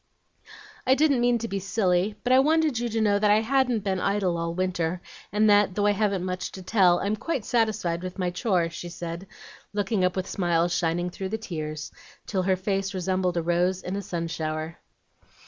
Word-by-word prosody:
"I 260 - +6
didn't 280 -4 +3
mean 245 0 +3
to 230 0 -4
be 195 -2 -3
silly; 195 0 +1
but 250 - +2
I 260 - +7
wanted 310 -2 +2
you 240 0 -1
to 225 0 -1
know 205 -2 +3
that 210 0 +3
I 210 +1 +5
hadn't 250 -2 +1
been 190 -2 -1
idle 195 -3 0
all 170 0 -3
winter, 180 -2 -1 0.3
and 210 +2 +3
that, 205 -2 +4
though 205 - +1
I 205 - +5
haven't 200 -3 0
much 185 0 -3
to 190 - -8
tell, 180 -3 +4
I'm 205 +2 0
quite 260 0 -3
satisfied 215 -8 0
with 185 +1 -6
my 180 -2 -1
chore," 180 -3 0
she 175 +1 -7
said, 170 +2 -6 0.5
looking 205 -1 0
up 180 0 +1
with 185 -1 -2
smiles 175 -2 +1
shining 175 +1 0
through 190 +1 -5
the 220 - -2
tears 155 -7 -5 0.3
till 190 -3 -1
her 185 +1 +2
face 195 +1 -2
resembled 185 -1 0
a 170 - 0
rose 175 +2 +1
in 185 - -3
a 200 - -2
sun 170 -3 -3
shower. 160 0 -4
190 Hz, 205 wpm, -26 LUFS, 175-215 Hz, 0.5 s, I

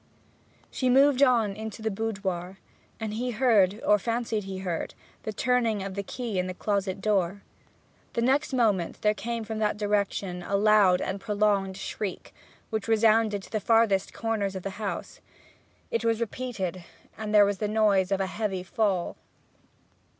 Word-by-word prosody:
She 255 - 0
moved 275 +1 +5
on 235 -7 +4
into 220 +1 -7
the 220 - 0
boudoir, 195 -4 -3 0.4
and 220 -2 -3
he 245 +3 -2
heard, 215 -4 +3
or 210 0 +5
fancied 230 -1 -2
he 190 -1 -5
heard, 170 -3 -3 0.3
the 215 - -4
turning 230 -2 +1
of 195 0 -5
the 200 - -2
key 220 -1 -4
in 180 - -1
the 185 - -5
closet 200 -1 -1
door. 200 -2 0 0.7
The 235 - 0
next 275 +5 +2
moment 215 -9 +1
there 210 0 +4
came 230 +1 -4
from 220 0 -5
that 210 -1 0
direction 200 -3 -1
a 200 +3 -2
loud 200 -3 +5
and 190 +1 -3
prolonged 205 -2 +1
shriek, 195 0 -5 0.4
which 220 -1 -2
resounded 220 -2 +3
to - - -14
the 215 - 0
farthest 215 -2 +3
corners 215 -4 -2
of 190 - -5
the 195 - -3
house. 205 - -5 0.7
It 465 - 0
was 230 -1 +1
repeated, 205 -6 -4 0.3
and 215 -1 -5
there 210 -1 +7
was 200 -1 -1
the 210 - 0
noise 205 -3 +2
of 195 - +2
a 195 - +1
heavy 190 -2 -3
fall. 185 -1 -1
210 Hz, 165 wpm, -27 LUFS, 195-225 Hz, 0.7 s, there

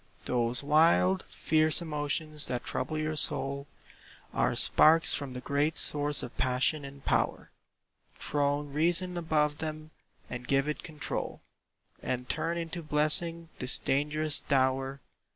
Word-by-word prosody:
Those 120 +1 +2
wild, 165 +5 +3
fierce 155 0 +2
emotions 150 -1 -2
that 125 -1 -3
trouble 155 - -3
your 155 0 -2
soul 140 -1 -1 0.7
Are - - +1
sparks 165 +1 +5
from 140 -3 -4
the 125 - -6
great 145 +5 0
source 145 0 +3
of 120 - -8
passion 130 +4 +1
and 140 0 -11
power; - - 0 0.7
Throne 145 0 -1
reason 175 +4 +1
above 155 -3 0
them, 155 0 -5 0.4
and 125 0 -7
give 135 +1 +2
it 150 - -3
control, 155 -3 -5 0.6
And 125 0 -3
turn 170 +1 -2
into 170 +1 -4
blessing 160 +2 -1
this 125 - -1
dangerous 150 +2 0
dower. 135 0 0
150 Hz, 130 wpm, -29 LUFS, 140-155 Hz, 0.7 s, sparks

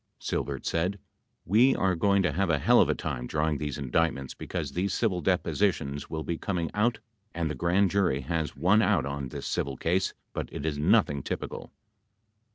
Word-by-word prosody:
Silbert 70 -2 -3
said, 90 +4 0 0.5
"We 120 +8 +5
are 95 -1 +2
going 100 +3 +2
to 90 - +2
have 95 0 0
a 80 - +3
hell - - +5
of - - +3
a - - +2
time 65 -5 -4
drawing 75 0 0
these 75 -1 -3
indict 75 +4 +1
ments 70 -1 -7
because 80 -7 -5
these 90 +4 -1
civil 95 -7 0
depositions 75 -5 0
will 80 -1 -3
be 85 - -3
coming 90 -5 -2
out 110 +2 +2 0.4
and 85 -2 -1
the - - -2
Grand 90 +6 +2
Jury 90 -9 +1
has 80 +1 -2
one 90 +9 +4
out 100 - +2
on 70 -1 -4
this - - -7
civil 65 -2 -2
case 90 +6 0 0.2
but - - -4
it 70 - -5
is 75 -2 -1
nothing 75 -1 +3
typical. - - -5
80 Hz, 190 wpm, -28 LUFS, 70-95 Hz, 0.5 s, We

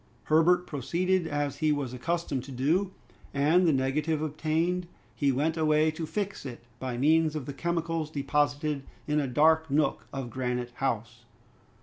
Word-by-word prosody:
Herbert 170 +3 +4
proceeded 175 +5 0
as 145 -2 -2
he 155 -1 +2
was 140 -4 -2
accustomed 145 0 -2
to 140 - -9
do, 160 +10 +1 0.4
and 160 +6 +4
the - - +5
negative 145 +3 0
obtained, 160 +4 -1 0.3
he 140 -2 +1
went 155 +5 0
away 155 0 +3
to 155 0 -5
fix 205 +2 -3
it 120 -4 -8 0.2
by 130 -2 -3
means 155 +3 +3
of 150 -4 -3
the 140 - -5
chemicals 165 0 -2
deposited 145 0 0 0.2
in 150 0 +1
a 140 - 0
dark 160 +4 +3
nook 150 +2 +1
of 135 -3 -5
Granite 125 0 -2
House. 120 -2 -3
150 Hz, 155 wpm, -28 LUFS, 135-160 Hz, 0.4 s, the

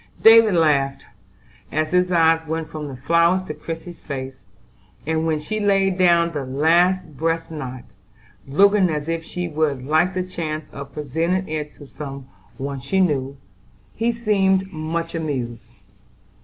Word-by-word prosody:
David 225 -3 +8
laughed, 140 -4 +2 0.7
as 155 0 -1
his 180 0 +2
eye 165 -1 +4
went 160 0 -3
from 155 -1 -5
the 135 - -7
flowers 170 +7 +2
to - - -6
Christie's 165 +1 -8
face, 135 -2 -7 0.6
and 160 +1 0
when 155 -1 0
she 215 +8 -4
laid 195 -2 +2
down 170 -2 +4
the 145 -4 -3
last 165 +5 +2
breast 165 +3 -1
knot, 130 -5 -6 0.6
looking 195 +6 +4
as 150 -1 -3
if 165 0 -2
she 180 +1 -4
would 150 -5 -1
like 160 +6 +2
the 185 - 0
chance 155 -4 -4
of 140 0 -8
presenting 165 +6 -1
it 150 -1 -4
to 145 - -13
some 135 -1 -8 0.3
one 140 0 -4
she 140 +9 -1
knew, 140 -6 0 0.6
he 230 +1 0
seemed 195 -4 +1
much 165 +1 -3
amused. 135 -8 -4
160 Hz, 150 wpm, -22 LUFS, 145-180 Hz, 0.7 s, David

